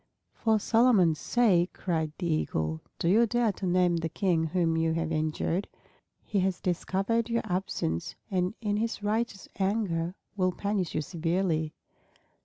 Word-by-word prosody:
"For 220 -1 +2
Solomon's 215 -7 +4
sake!" 195 -8 +2
cried 160 -4 -1
the 180 - -4
Eagle. 80 - -1 0.2
"Do - - -1
you 225 +6 +5
dare 240 -1 +2
to 190 -1 -5
name 180 -1 +3
the 165 0 -2
King 165 -1 +1
whom 165 0 +1
you 160 0 +1
have 165 0 -1
injured? 155 +4 -1 0.6
He 205 - -1
has 185 -1 0
discovered 195 +6 0
your 230 0 0
absence 180 - -2 0.2
and 185 +2 0
in 205 -2 0
his 225 -1 -2
righteous 215 -1 -1
anger 190 -4 0 0.2
will 185 -2 +1
punish 200 -2 -2
you - - +1
severely." 165 -1 -1
185 Hz, 150 wpm, -29 LUFS, 165-205 Hz, 0.6 s, you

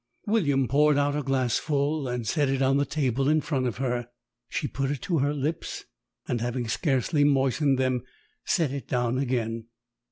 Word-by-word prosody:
William 145 - +2
poured 145 +4 +4
out 145 0 +1
a 150 - 0
glassful 140 +3 0
and 125 -2 -3
set 145 -4 +1
it 135 0 +1
on 135 +1 +3
the 140 - +1
table 135 -2 0
in 155 +1 +4
front 140 -4 -1
of 120 - -3
her. 120 -2 -2 0.4
She - - -2
put 135 +3 -2
it 140 -3 -3
to 170 -4 0
her 140 +2 +2
lips, 150 +3 -3 0.4
and 120 -2 -1
having 120 0 -2
scarcely 145 +4 +1
moistened 135 0 +3
them, 130 -1 +1 0.4
set 160 -7 +1
it 140 -1 -5
down 125 0 0
again. 115 -4 -1
135 Hz, 180 wpm, -27 LUFS, 125-145 Hz, 0.4 s, poured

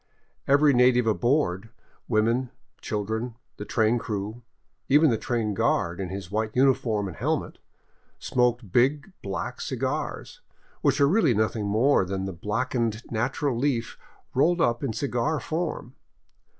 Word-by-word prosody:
Every 145 +1 +5
native 125 -1 +4
aboard, 110 - +1 0.2
— - - -36
women, 120 +4 +1 0.3
children, 110 +3 -3 0.2
the 105 - -6
train 110 +2 +2
crew, 110 0 -4 0.5
even 145 +1 +5
the - - +2
train 115 -4 -1
guard 85 -2 0
in 95 -2 -3
his 95 -1 -7
white 110 +1 -2
uniform 125 -6 +2
and 90 - -7
helmet - - -2 0.3
— - - -40
smoked 120 -4 0
big, 145 - +2
black 95 -3 -4
cigars, - - -4 0.4
which - - +2
are 140 - +5
really 160 - +3
nothing 110 0 0
more 115 +5 +3
than 95 +1 -3
the 95 - -4
black 105 +9 -2
ened 115 -2 -2
natural 125 +4 -1
leaf 120 -2 -1 0.4
rolled 170 +7 +3
up 120 -4 +1
in 135 - -1
cigar 135 +5 -1
form. 160 -6 -4
120 Hz, 145 wpm, -26 LUFS, 105-135 Hz, 0.5 s, Every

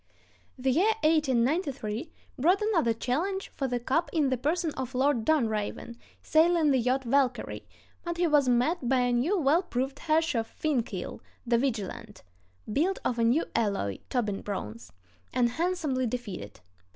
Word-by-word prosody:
The 260 +1 +1
year 390 - +3
1893 275 - +1 0.3
brought 355 +8 +4
another 365 - +2
challenge 325 - -2
for 270 - -3
the 245 -1 -1
cup 270 +8 0
in 300 -5 +2
the - - +3
person 320 +6 0
of 260 0 -5
Lord 265 -2 +2
Dunraven, 230 -4 0 0.3
sailing 320 -1 +4
the 265 - +3
yacht 255 +3 +1
Valkyrie, 265 +1 0 0.4
but 345 -1 -4
he 350 - +2
was 295 -5 +3
met 250 +3 +1
by 260 -1 +3
a 245 0 +1
new, 290 +12 +1
well 315 +1 +3
proved 270 -5 -3
Herreshoff 310 -8 +1
fin 295 -2 0
keel, 190 -5 -6 0.2
the 235 -1 +2
Vigilant 220 -4 -4 0.5
(built 355 - +1
of 240 - 0
a - - +3
new 245 +8 +3
alloy—Tobin 205 - -1
bronze), 115 - -6 0.4
and 245 -1 +3
handsomely 305 -3 -1
defeated. 215 - -6
265 Hz, 150 wpm, -28 LUFS, 235-320 Hz, 0.5 s, brought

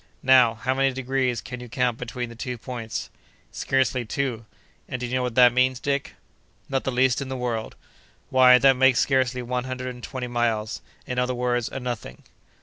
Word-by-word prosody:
"Now, 125 -3 +6
how 130 +4 -1
many 135 0 +2
degrees 130 -2 -1
can 125 0 -8
you 125 -1 -9
count 125 -1 0
between 125 0 -5
the 115 - -11
two 125 +1 -5
points?" 115 -2 -6 0.4
"Scarcely 130 -1 0
two." 115 -2 -3 0.4
"And 125 - -4
do 125 - -3
you 120 - -5
know 130 - +1
what 125 -2 -3
that 125 -1 +7
means, 130 0 +2
Dick?" 140 +1 -2 0.5
"Not 135 -1 -2
the 135 - 0
least 130 +1 +2
in 135 - -5
the 130 - -4
world." 120 -3 -3 0.6
"Why, 130 -1 +7
that 135 +1 +5
makes 130 -1 +4
scarcely 130 -2 +1
one 125 +1 -2
hundred 130 0 -4
and 125 -1 -9
twenty 130 0 -5
miles—in 120 +1 -3
other 125 0 0
words, 120 -1 0
a - - -5
nothing." 120 - -6
125 Hz, 190 wpm, -24 LUFS, 120-130 Hz, 0.6 s, that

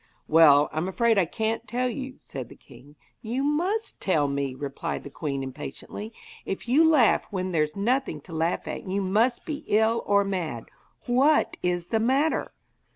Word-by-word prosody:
'Well, 150 -2 +6
I'm 155 +4 -2
afraid 225 +2 +2
I 185 - +3
can't 220 +6 -2
tell 250 +1 -1
you,' 265 +1 -5
said 130 -4 -7
the - - -13
king. 140 +5 -17 0.3
'You 240 +5 -2
must 355 +10 -1
tell 155 -7 +2
me,' 140 -2 -2
replied 140 0 -4
the 140 - -9
queen 140 -2 -3
impatiently. 145 - -7 0.3
'If 195 - -5
you 275 +7 +5
laugh 300 -9 +4
when 185 -2 -3
there's 155 -3 0
nothing 235 - 0
to 165 - -12
laugh 165 +2 -1
at - - -6
you 190 +2 -1
must 215 +6 +1
be 310 -3 -5
ill 220 +2 +2
or 200 0 +4
mad. 170 - -3 0.4
What 270 +5 +3
is 175 -1 -1
the 225 - +1
matter?' 270 +7 +1
200 Hz, 170 wpm, -26 LUFS, 155-245 Hz, 0.4 s, Well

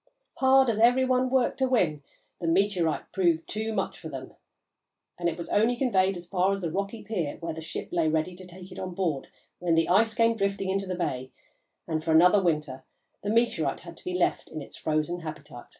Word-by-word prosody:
Hard 265 0 +5
as 220 - -3
every 245 +3 +5
one 255 0 +2
worked 260 +1 +1
to 260 -1 +2
win, 175 - +2 0.4
the 170 - -3
meteorite 180 -2 +1
proved 170 -4 +1
too 220 +1 -3
much 195 -3 -2
for 160 - -7
them, 130 -3 -8 0.9
and 175 -1 +1
it 165 - -5
was 170 - -6
only 225 +4 +3
conveyed 195 -7 +2
as 175 - -9
far 185 +1 +1
as 195 0 -2
the 170 -3 -2
rocky 200 +5 -3
pier 175 -10 -3
where 165 -1 -4
the 160 - -7
ship 160 - -6
lay 170 -2 +1
ready 160 +3 0
to 185 0 -11
take 180 +1 -12
it - - -8
on 185 -1 -5
board 165 -8 -1 0.3
when 175 -2 +1
the 165 0 +3
ice 220 +5 +3
came 230 0 +3
drifting 195 -2 -1
into 195 0 -1
the 185 - -2
bay, 130 -7 -3 0.6
and 155 -1 -2
for 160 0 +1
another 180 +5 +6
winter 150 -7 -1 0.4
the 205 - -3
meteorite 220 - +1
had 170 0 -10
to - - -13
be 180 - -3
left 180 - 0
in 155 - -6
its 140 - -10
frozen 155 +3 -1
habitat. 150 -6 -9
180 Hz, 215 wpm, -27 LUFS, 160-210 Hz, 0.9 s, another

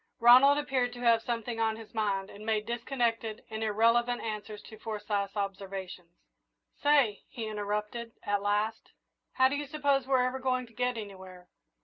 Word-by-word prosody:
Ronald 255 +4 +8
appeared 260 -4 0
to 245 - -9
have 230 -2 +4
something 230 0 -3
on 220 -1 +1
his 225 0 -12
mind, 200 -3 -1
and 205 - -11
made 215 -1 0
disconnected 235 -2 -2
and 220 0 -3
irrelevant 230 +3 +2
answers 210 -1 -5
to 220 - -12
Forsyth's 205 -2 -3
observations. 195 -3 -5 0.7
"Say," 280 -8 +3
he 230 - -5
interrupted, 210 +2 -3
at 205 0 0
last, 210 +2 -1 0.4
"how 260 -1 +5
do 270 - -1
you 290 0 -3
suppose 280 -3 +1
we're 260 -2 +3
ever 255 +1 -2
going 255 -1 0
to 230 - -20
get 250 0 -1
anywhere?" 190 -4 -9
225 Hz, 160 wpm, -30 LUFS, 210-245 Hz, 0.7 s, Ronald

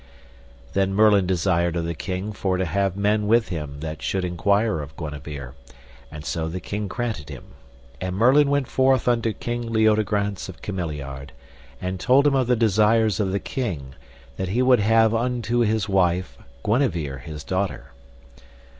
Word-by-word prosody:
Then 95 0 +1
Merlin 105 -3 +5
desired 85 -2 +1
of 85 -1 -1
the 85 - -2
king 95 +5 -4
for 95 -2 -1
to 95 - 0
have 100 +1 0
men 105 +1 +1
with 115 +1 +3
him 75 -5 -5
that 80 -1 -5
should 95 -1 -1
enquire 100 +2 +1
of 75 +2 -10
Guenever, 75 -4 -7 0.6
and 75 0 -9
so 80 -1 -2
the 85 +3 -4
king 105 +3 -4
granted 110 -7 -4
him, - - -10 0.5
and 90 0 -3
Merlin 135 +7 +5
went 140 -2 +1
forth 130 -2 +2
unto 115 -2 +2
King 120 +1 -4
Leodegrance 105 -3 +1
of - - -11
Cameliard, 75 -8 -5 0.5
and 90 0 -4
told 135 +7 +4
him 145 - +4
of 130 -3 +2
the 125 - +3
desires 110 -1 +3
of 100 -3 0
the 100 - 0
king 85 - -4 0.4
that 95 -1 -3
he 120 +6 +1
would 125 -2 +5
have 110 +1 +4
unto 120 0 0
his 110 -2 +1
wife 95 -2 +1 0.3
Guenever 90 - 0
his 75 -1 -8
daughter. 95 +1 -3
100 Hz, 165 wpm, -23 LUFS, 85-115 Hz, 0.6 s, Merlin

